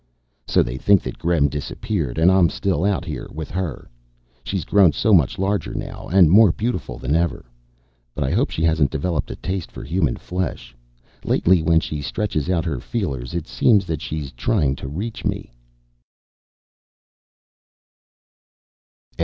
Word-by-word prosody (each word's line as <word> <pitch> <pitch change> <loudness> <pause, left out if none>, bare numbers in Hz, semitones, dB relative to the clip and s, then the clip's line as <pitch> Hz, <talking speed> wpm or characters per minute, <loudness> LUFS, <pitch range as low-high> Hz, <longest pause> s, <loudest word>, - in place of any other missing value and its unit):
So - - +3
they 65 +2 -5
think 100 +3 +4
that - - -6
Gremm 85 -4 +2
disappeared. 75 - -3
And 85 +3 +5
I'm 95 -3 +4
still 95 -2 -1
out 100 -1 0
here 75 -5 -5
with 80 -2 -7
her. 90 -7 -4 0.6
She's 95 +2 -3
grown 95 -6 +5
so 110 - +2
much 80 -8 +4
larger 95 -2 -1
now, - - -6
and 90 -2 +5
more 105 -1 +7
beautiful 85 - -3
than 65 +4 -1
ever. 85 -6 0 0.7
But 75 - -1
I 65 - -1
hope - - +1
she 80 - -3
hasn't 80 -3 +3
developed 80 0 -2
a - - -5
taste 95 -2 -4
for - - -9
human 75 -2 0
flesh. 75 -9 -5 0.5
Lately, 90 -1 +3
when 80 +1 +3
she 75 -2 -4
stretches 75 +2 -2
out 85 -2 +1
her 80 -4 -2
feelers, 75 - -4
it 85 -2 -3
seems 105 -5 +3
that 80 -4 -3
she's 75 -4 -5
trying 70 - 0
to - - -7
reach 100 +11 -5
me. - - -3
80 Hz, 155 wpm, -21 LUFS, 70-95 Hz, 0.7 s, more